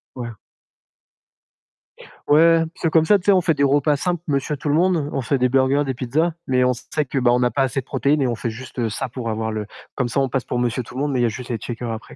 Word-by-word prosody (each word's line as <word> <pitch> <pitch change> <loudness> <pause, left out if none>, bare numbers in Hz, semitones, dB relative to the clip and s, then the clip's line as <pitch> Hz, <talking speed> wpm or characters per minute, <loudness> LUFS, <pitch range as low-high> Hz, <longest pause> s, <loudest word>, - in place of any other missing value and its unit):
Ouais. 120 -2 -5 2.0
Ouais, 165 +2 +6 0.2
parce - - -15
que - - +3
comme 160 0 +3
ça, 205 +4 +5
tu 185 - -13
sais, 200 - +5
on 185 - +4
fait 165 -1 +2
des 140 - 0
repas 145 +2 +3
simples 175 +3 -2
monsieur 140 0 -1
tout 145 - -4
le 145 - +2
monde. 170 -3 +2
On 135 - -1
fait 140 +2 0
des 125 0 +2
burgers, 135 +2 +2
des 135 - -2
pizzas, 145 +7 0
mais 125 -1 +2
on 125 - +3
sait 145 +5 -3
que, 135 - -5
bah, 125 -2 +3
on 125 - +3
n'a 125 0 +2
pas 135 +4 +1
assez 135 +1 -1
de - - -24
protéines 140 +3 +1
et 135 - +2
on 120 - -1
fait 115 +1 -3
juste, 125 +5 -10
heu, 115 -2 0
ça 125 +4 -4
pour 120 -1 -5
avoir 110 0 -2
le 110 -1 -3 0.3
comme 125 - 0
ça 120 - 0
on 135 -1 +1
passe 130 0 -1
pour 125 - -2
monsieur 120 +1 -1
tout 120 - -13
le 130 - -2
monde, 145 0 0
mais 130 - 0
il - - +2
y - - +4
a - - +2
juste 120 +3 -8
les 115 -2 -2
shakers 120 +1 -5
après. 110 0 -8
130 Hz, 295 wpm, -21 LUFS, 120-150 Hz, 2.0 s, Ouais